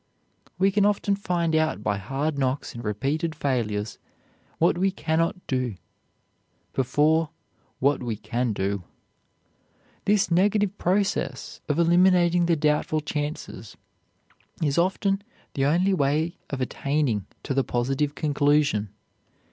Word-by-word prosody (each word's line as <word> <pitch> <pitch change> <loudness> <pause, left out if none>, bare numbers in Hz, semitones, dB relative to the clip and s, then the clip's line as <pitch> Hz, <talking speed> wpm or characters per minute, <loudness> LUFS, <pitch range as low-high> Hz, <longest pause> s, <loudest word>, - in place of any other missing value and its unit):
We 195 +2 +3
can 205 +1 +2
often 200 0 +2
find 175 -4 0
out 155 -9 +1
by 100 -2 0
hard 135 +9 -2
knocks 130 +1 -1
and 120 - -7
repeated 140 +10 -1
failures 115 -8 -2 0.6
what 170 - +3
we 195 +1 +3
can 160 -4 -1
not 170 +2 -1
do 125 -5 -1 1.0
before 150 +5 +2 0.5
what 140 +2 +2
we 120 -3 -2
can 120 +3 -2
do. 100 -1 -2 1.2
This 200 -4 +2
negative 200 +3 +2
process 200 +3 -1
of 145 - +1
eliminating 175 0 +4
the 170 - +3
doubtful 150 0 +1
chances 145 - -5 0.9
is 145 +1 +2
often 195 +2 +1 0.3
the 135 - 0
only 180 +7 +3
way 155 +2 0
of 135 -2 -4
attaining 130 -6 -1 0.2
to - - -2
the 135 0 +2
positive 135 +5 -1
conclusion. 145 -7 +2
150 Hz, 125 wpm, -25 LUFS, 130-175 Hz, 1.2 s, eliminating